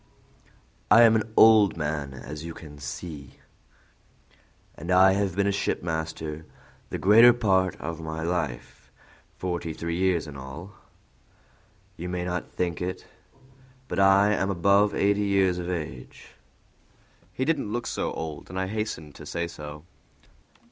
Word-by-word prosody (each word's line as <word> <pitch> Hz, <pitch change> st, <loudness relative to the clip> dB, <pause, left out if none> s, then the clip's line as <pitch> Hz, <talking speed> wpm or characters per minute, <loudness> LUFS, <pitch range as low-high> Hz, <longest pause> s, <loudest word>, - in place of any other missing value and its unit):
"I 115 Hz, +3 st, +8 dB
am 115 Hz, -1 st, +6 dB
an 110 Hz, 0 st, -1 dB
old 110 Hz, -5 st, +6 dB
man, 75 Hz, -3 st, -3 dB
as 75 Hz, +3 st, -8 dB
you 85 Hz, -1 st, -7 dB
can 75 Hz, -3 st, -12 dB
see," 70 Hz, +5 st, -6 dB
he -, -, -11 dB
continued, -, -, -22 dB, 1.3 s
"and 85 Hz, +4 st, -6 dB
I 95 Hz, +1 st, +6 dB
have 95 Hz, -2 st, 0 dB
been 100 Hz, 0 st, +1 dB
a 100 Hz, -, +2 dB
shipmaster 80 Hz, -4 st, -3 dB, 0.5 s
the -, -, -3 dB
greater 115 Hz, +5 st, +7 dB
part 95 Hz, -6 st, +1 dB
of 85 Hz, +1 st, -6 dB
my 80 Hz, 0 st, -5 dB
life, 85 Hz, +1 st, -4 dB, 0.5 s
forty 85 Hz, -3 st, -3 dB
three 85 Hz, +1 st, -4 dB
years 90 Hz, -3 st, +1 dB
in 75 Hz, -3 st, -9 dB
all. 70 Hz, +8 st, -9 dB, 1.3 s
You 90 Hz, +2 st, -5 dB
may 90 Hz, 0 st, -3 dB
not 90 Hz, 0 st, -3 dB
think 85 Hz, -2 st, -2 dB
it, 90 Hz, +1 st, -4 dB, 0.8 s
but -, -, -3 dB
I 100 Hz, +2 st, +5 dB
am 95 Hz, -1 st, 0 dB
above 100 Hz, +3 st, +3 dB
eighty 100 Hz, +1 st, +2 dB
years 95 Hz, -3 st, +2 dB
of 90 Hz, 0 st, -4 dB
age." 75 Hz, -8 st, -6 dB, 1.0 s
He 130 Hz, -, -2 dB
did 160 Hz, 0 st, +1 dB
not -, -, -4 dB
look 120 Hz, +3 st, -3 dB
so -, -, -2 dB
old, 80 Hz, -2 st, -6 dB
and 95 Hz, +1 st, -4 dB
I 95 Hz, -, 0 dB
hastened 95 Hz, -7 st, -4 dB
to -, -, -12 dB
say 85 Hz, 0 st, -3 dB
so. 75 Hz, -2 st, -9 dB
90 Hz, 155 wpm, -26 LUFS, 80-100 Hz, 1.3 s, I